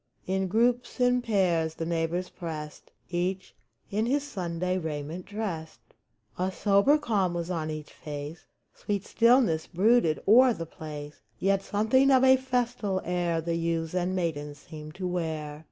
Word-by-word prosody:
In 190 0 0
groups, 240 +6 +1
in 250 0 +3
pairs, 175 -8 +1
the 165 - -4
neighbors 170 +2 -1
pressed, 155 -3 -7 0.2
Each 185 +2 -2 0.4
in 215 +3 0
his 280 +3 +1
Sunday 180 -6 -2
raiment 160 +2 -5
dressed. 195 -7 -6 0.5
A 185 +1 0
sober 200 - +4
calm 200 -10 0
was 170 +1 -3
on 160 -3 -2
each 155 -1 -6
face; 150 +2 -7 0.3
Sweet 200 -2 -3
stillness 230 -9 +3
brooded 190 -3 +3
o'er 245 +3 +7
the 165 - -5
place; 150 -2 -9 0.2
Yet 195 0 +1
something 220 +8 +2
of 260 -1 +5
a 260 0 +7
festal 245 -6 -1
air 175 -2 0
The 170 +1 -2
youths 165 -1 -1
and 180 +1 0
maidens 150 -5 -3
seemed 155 +1 -10
to 185 -1 -3
wear. 160 -4 -3
180 Hz, 150 wpm, -28 LUFS, 160-215 Hz, 0.5 s, o'er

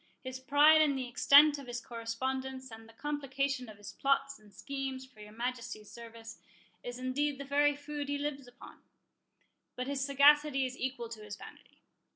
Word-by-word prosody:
His 260 0 -6
pride 295 +3 +6
in 295 -3 +3
the 260 -2 -3
extent 285 +4 +6
of 275 - -10
his 245 0 -4
correspondence, 260 +3 -4
and 225 0 -11
the - - -16
complication 275 -2 -2
of 210 - -12
his 205 -1 -10
plots 275 -1 0
and 210 -1 -19
schemes 270 +1 -5
for 255 -5 -22
your 210 0 -11
Majesty's 235 -2 -5
service, 230 -1 -11 0.4
is 245 0 -6
indeed 270 +3 -1
the 280 - -6
very 290 +1 +3
food 290 0 -6
he 285 - 0
lives 285 -2 -4
upon; 245 +1 -14 0.9
but 250 - -3
his 275 0 -2
sagacity 280 0 +5
is 255 0 -5
equal 260 -2 -4
to 225 -2 -8
his 210 -1 -7
vanity. - - -15
265 Hz, 180 wpm, -32 LUFS, 240-280 Hz, 0.9 s, pride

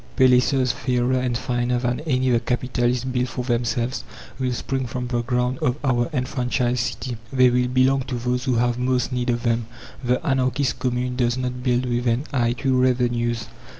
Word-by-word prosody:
Palaces 130 0 +4
fairer 125 +2 0
and 125 -2 0
finer 120 +1 -1
than 120 0 -1
any 130 -2 +2
the 120 - +4
capitalists 125 0 0
built 125 -1 -1
for 125 - -4
themselves 120 +1 -1 0.4
will 130 -1 0
spring 130 +1 -2
from 125 +1 -4
the 120 -1 -1
ground 125 +1 -1
of 125 +2 0
our 120 -3 +1
enfranchised 125 -2 -1
city. 120 +1 -3
They 130 -2 +5
will 125 0 +2
belong 130 +2 +3
to 125 -1 -4
those 125 +1 -1
who 130 -2 +1
have 120 +1 +1
most 125 0 0
need 125 0 -1
of 120 0 0
them. 115 -2 0 0.4
The 125 +1 +1
anarchist 130 0 +1
Commune 125 0 -1
does 120 -1 +1
not 125 -1 -3
build 125 0 +1
with 120 0 -1
an 120 +3 +1
eye 120 -3 +2
to 130 +1 0
revenues. 120 -2 +1
125 Hz, 185 wpm, -23 LUFS, 120-130 Hz, 0.4 s, They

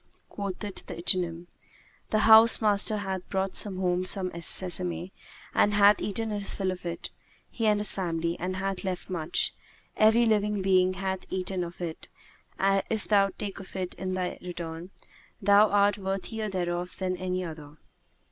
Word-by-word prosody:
Quoth 200 -3 -5
the 205 - -5
ichneumon, 175 -2 -1 0.6
"The 215 - +1
house 225 +1 +9
master 210 0 +2
hath 190 -2 -5
brought 190 -1 -2
home 185 -3 -1
sesame 180 0 -1 0.4
and 205 0 +3
hath 205 0 +5
eaten 220 +2 -1
his 205 -1 +2
fill 190 -2 -1
of 180 -1 -7
it, 170 0 -5 0.4
he 225 -2 -1
and 210 -1 +3
his 210 - +4
family, 170 -2 -2
and 185 +2 -3
hath 195 0 -3
left 185 -1 -4
much; 170 -1 0 0.4
every 220 +2 +4
living 210 -2 +1
being 185 -1 +3
hath 190 0 -4
eaten 185 0 -2
of 170 0 -8
it 165 -2 -6 0.5
and, 195 0 +2
if 220 -2 -3
thou 200 -2 +4
take 205 -2 -5
of 195 - -12
it 185 -1 -3
in 185 +1 -4
they 180 -1 -3 0.2
turn, 165 +1 -6 0.5
thou 205 +1 +5
art 205 0 +3
worthier 195 +3 -3
thereof 175 -1 -3
than 185 -1 -2
any 185 0 -3
other." 155 -3 -9
190 Hz, 155 wpm, -27 LUFS, 180-205 Hz, 0.6 s, house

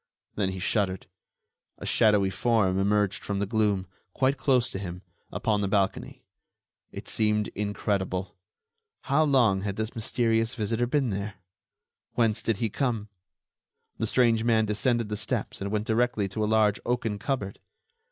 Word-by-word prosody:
Then 100 -2 0
he 95 - -5
shuddered; 95 0 -1 0.7
a - - -8
shadowy 105 -3 +3
form 95 -3 +2
emerged 100 0 +1
from 100 - -2
the 100 - 0
gloom, 105 -2 +1 0.3
quite 135 +1 +2
close 130 -3 +2
to 95 - -4
him, 90 -1 -6 0.3
upon 105 -2 0
the 100 - 0
balcony. 100 -1 -1 0.7
It - - -8
seemed 105 -1 +1
incredible. 100 -2 -2 0.7
How 145 +1 +2
long 120 -10 +3
had 100 -1 -3
this 110 +1 -3
mysterious 115 0 0
visitor 115 +1 0
been 135 -2 +1
there? 100 +2 -4 0.8
Whence 115 -3 +1
did 115 -3 0
he 115 - 0
come? 110 -2 -2 0.9
The 110 - 0
strange 115 -1 +3
man 115 -2 +3
descended 110 +2 0
the 105 - -2
steps - - -3
and 100 - -2
went 105 +1 -1
directly 115 -2 +1
to 110 +3 -2
a - - +1
large 110 -2 +3
oaken 115 -4 -1
cupboard. 105 -5 -3
105 Hz, 150 wpm, -27 LUFS, 100-115 Hz, 0.9 s, shadowy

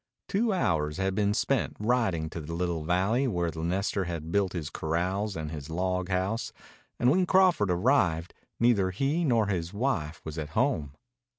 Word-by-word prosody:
Two 220 +3 +1
hours 80 - 0
had 95 0 0
been 100 +1 +1
spent 125 +3 0
riding 105 -8 +1
to 80 - -5
the 80 +2 -6
little 85 -2 -1
valley 95 - +1
where 85 -7 0
the 80 +1 -6
nester 95 +3 -1
had 85 -2 -5
built 100 -1 +1
his 80 -3 -4
corrals 95 +6 -1
and 75 -1 -4
his 75 -2 -7
log 90 +2 -1
house, 95 +5 -1 0.5
and 125 - +4
when 180 +3 +2
Crawford 185 - +4
arrived 90 - +2 0.3
neither 115 -6 +3
he 140 - 0
nor 120 -8 +3
his 90 -2 -3
wife 90 - -1
was 80 +1 -5
at 75 -1 -4
home. 70 -3 +1
95 Hz, 175 wpm, -28 LUFS, 80-115 Hz, 0.5 s, and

